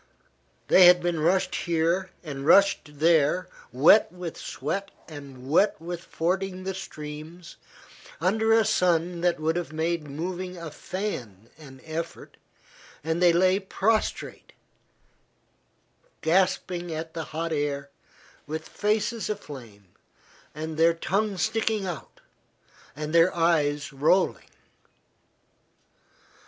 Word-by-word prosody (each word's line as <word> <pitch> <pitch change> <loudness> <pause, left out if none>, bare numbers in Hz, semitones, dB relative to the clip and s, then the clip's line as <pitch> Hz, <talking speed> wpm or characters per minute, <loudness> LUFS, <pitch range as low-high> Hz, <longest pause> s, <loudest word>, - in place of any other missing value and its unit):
They 185 -1 +8
had 180 0 +7
been 175 -2 -1
rushed 185 +5 +2
here 170 +2 0
and 140 -4 -6
rushed 160 -3 +4
there 160 +2 +3 0.2
wet 145 - +5
with 180 -2 -7
sweat 195 +9 -4 0.2
and 140 -4 -10
wet 170 +7 +3
with 170 +1 -6
fording 185 +2 -2
the 190 +1 -3
streams, 160 -1 -9 0.6
under 220 +6 +1
a 225 -1 +5
sun 175 -1 +1
that 175 -2 +1
would 160 +1 0
have 175 - -4
made 160 0 -2
moving 180 +5 -5
a 165 -2 -7
fan 120 - -6
an 135 -4 -14
effort, 160 +1 -6 0.7
and 160 +2 -1
they 175 -1 +6
lay 185 +3 +3
prostrate, 215 +3 -1 1.7
gasping 180 0 +1
at 160 0 -5
the 165 -1 -4
hot 165 +1 -3
air, 140 -1 -2 0.6
with 155 +2 -5
faces 215 +2 -1
aflame, 120 - -8 0.7
and 155 0 -5
their 165 +1 +4
tongues 195 +3 -1
sticking 220 -2 0
out, 175 -3 -7 0.7
and 150 +2 -5
their 170 +2 +5
eyes 150 -4 +1
rolling. 155 +7 +1
170 Hz, 115 wpm, -26 LUFS, 155-185 Hz, 1.7 s, They